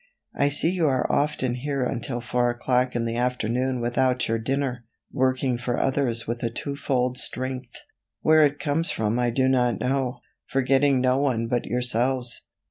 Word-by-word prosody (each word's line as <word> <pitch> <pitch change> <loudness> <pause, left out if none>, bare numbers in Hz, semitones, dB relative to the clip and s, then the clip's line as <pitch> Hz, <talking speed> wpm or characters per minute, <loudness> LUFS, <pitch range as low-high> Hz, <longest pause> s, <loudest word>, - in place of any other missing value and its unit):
I 140 - +2
see 150 +4 +1
you 175 -4 +1
are 130 -2 +1
often 140 -4 0
here 135 +1 -2
until 120 -1 -3
4 120 +1 +1
o'clock 125 +1 0
in 120 -1 0
the 115 0 -2
afternoon 125 +1 0
without 125 +2 +1
your 115 0 0
dinner, 130 0 -2 0.3
working 130 -1 +1
for 120 0 -2
others 130 -4 0
with 120 +1 -3
a 115 - 0
two 140 +5 -5
fold 125 -2 0
strength. 130 -1 -3 0.5
Where 155 0 +6
it 145 0 +2
comes 160 +3 0
from 110 +2 0
I 120 -1 +2
do 130 +2 +2
not 125 -5 +2
know 130 0 -1 0.3
forgetting 135 0 +2
no 130 +1 +2
one 125 -5 +1
but 120 +1 -1
yourselves. 125 0 -1
125 Hz, 170 wpm, -25 LUFS, 120-135 Hz, 0.5 s, Where